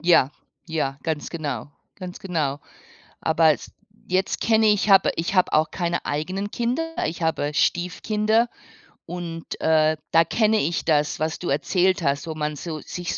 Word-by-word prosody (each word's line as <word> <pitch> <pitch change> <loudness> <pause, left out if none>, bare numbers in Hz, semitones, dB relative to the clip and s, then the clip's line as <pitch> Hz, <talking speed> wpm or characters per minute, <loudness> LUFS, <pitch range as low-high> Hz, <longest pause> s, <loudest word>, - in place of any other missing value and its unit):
Ja, 170 -6 +4 0.4
ja, 145 -5 -2
ganz 155 -2 -2
genau. 145 -7 -4 0.3
Ganz 185 -1 -8
genau. 150 -7 -2 0.6
Aber 160 0 +4
s - - -8 0.3
jetzt 185 +1 0
kenne 220 -1 +3
ich 210 0 +2
hab 195 -1 +7
ich 170 +4 -2
habe 185 - +3
auch 155 +1 +3
keine 175 -1 -2
eigenen 185 +8 -3
Kinder, 260 +10 -2
ich 165 +2 -4
habe 150 -2 0
Stiefkinder 215 +8 +1 0.6
und, 170 -1 -6
äh, 155 0 +3
da 165 0 +6
kenne 220 +4 +2
ich 165 +2 -1
das, 150 -2 +1
was 160 +1 -2
du 180 - -4
erzählt 180 +7 +2
hast, 140 -1 0
wo 160 - -4
man 150 -1 -2
so 155 +1 -5
sich 175 +3 -5
165 Hz, 160 wpm, -24 LUFS, 155-190 Hz, 0.6 s, hab